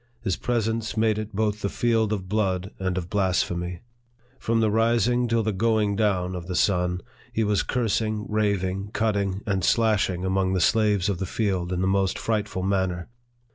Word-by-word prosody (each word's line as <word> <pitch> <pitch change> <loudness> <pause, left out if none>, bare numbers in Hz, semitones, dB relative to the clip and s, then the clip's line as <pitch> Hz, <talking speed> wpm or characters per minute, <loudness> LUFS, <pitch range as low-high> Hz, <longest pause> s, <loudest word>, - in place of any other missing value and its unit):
His 95 - 0
presence 115 -2 -1
made 110 -1 +2
it 110 0 -5
both 105 0 0
the 100 - -1
field 115 -2 +1
of 95 -3 -2
blood 95 -2 -1
and 95 -1 -1
of 85 -2 -3
blasphemy. 90 -2 -1 0.6
From 115 0 +1
the 110 -2 +2
rising 115 +2 +2
till 115 -1 +1
the 110 - 0
going 105 0 +1
down 95 -4 +1
of 90 -2 -6
the 90 - -3
sun, 90 -1 +1 0.3
he 115 - 0
was 105 -1 +2
cursing, 110 -3 -1
raving, 100 -2 -1
cutting, 100 -3 0
and 95 -3 -1
slashing 100 -5 +2
among 95 0 +1
the 95 - +1
slaves 105 0 +3
of 100 -4 -1
the 95 - -2
field, 95 -5 -1
in 90 0 -1
the 95 - +1
most 95 -1 +1
frightful 105 -4 -2
manner. 95 -2 -1
100 Hz, 175 wpm, -25 LUFS, 95-110 Hz, 0.6 s, slaves